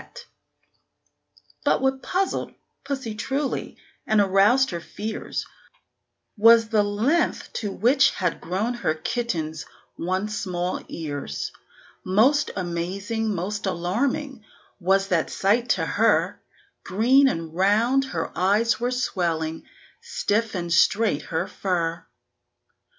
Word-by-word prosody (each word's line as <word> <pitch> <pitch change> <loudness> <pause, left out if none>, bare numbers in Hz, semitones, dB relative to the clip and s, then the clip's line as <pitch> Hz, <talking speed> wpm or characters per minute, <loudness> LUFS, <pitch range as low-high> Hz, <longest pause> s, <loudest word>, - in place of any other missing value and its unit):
But - - +3
what 265 0 0
puzzled 380 +1 -2 0.3
pussy 270 -5 -4
truly, 270 +6 -3 0.3
and 215 -1 +3
aroused 205 +7 +4
her 170 - -3
fears, 215 +5 -5 0.9
Was 225 +1 +6
the 220 -2 +3
length 215 +11 0
to 205 -3 -3
which 260 +7 +4
had 180 -3 -2
grown 195 +8 -1
her 235 -10 -1
kitten's 160 -5 -3 0.4
once 190 +5 -2
small 180 -3 -2
ears. 145 - -5 0.5
Most 265 +11 +3
amazing, 195 +5 -2
most 200 +3 -3
alarming, 235 - -1 0.4
was 195 +2 +2
that 170 -4 +1
sight 230 +5 +1
to - - -1
her; - - +2 0.4
Green 250 +8 +4
and 165 -9 -3
round 220 +9 +3
her 265 - -4
eyes 205 +5 +2
were 245 +1 0
swelling, 170 -10 -2 0.3
stiff 230 - -1
and 175 -2 -2
straight 200 -1 +3
her 165 +2 -2
fur. 170 -3 -2
205 Hz, 110 wpm, -24 LUFS, 180-240 Hz, 0.9 s, Was